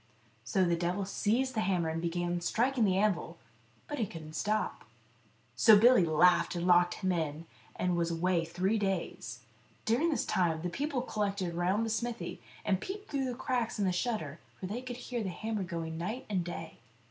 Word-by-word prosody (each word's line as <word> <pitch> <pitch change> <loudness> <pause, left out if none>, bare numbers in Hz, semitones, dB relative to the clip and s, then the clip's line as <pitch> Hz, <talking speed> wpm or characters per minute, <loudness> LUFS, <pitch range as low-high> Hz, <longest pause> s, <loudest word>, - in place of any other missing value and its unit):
So 185 +11 +2
the 170 -1 +2
devil 180 +3 -1
seized 240 +7 0
the 220 - -1
hammer 180 -5 +1
and 160 +1 -2
began 175 +1 -1
striking 240 +6 +2
the 190 -2 +2
anvil, 205 -2 0 0.5
but 295 -4 -4
he 220 - +1
couldn't 155 -3 -9
stop. 215 +5 -1 0.7
So 210 - +8
Billy 240 -1 +6
laughed, 175 +4 +4
and 175 0 -2
locked 175 -1 +5
him 185 -2 -1
in, 160 -2 -2 0.3
and 180 -1 0
was 170 -1 +1
away 170 +1 +1
three 185 +6 0
days. 170 - -3 0.4
During 245 +10 +2
this 305 - 0
time 165 -3 +1
the 180 - -1
people 280 - -1
collected 200 -6 -2
round 185 +6 +1
the 225 - -2
smithy, 235 +1 -3 0.2
and 190 -2 +1
peeped 405 +2 -6
through 275 -2 0
the 250 -1 -3
cracks 245 -2 -1
in 205 - +1
the 185 - +2
shutter, 175 -6 -2 0.2
for - - -5
they 215 +6 -4
could 250 -1 -6
hear 245 -1 -4
the 200 - -2
hammer 215 +3 -3
going 165 -3 -4
night 215 +9 -4
and 185 -3 +1
day. 165 -2 -7
190 Hz, 190 wpm, -31 LUFS, 170-225 Hz, 0.7 s, So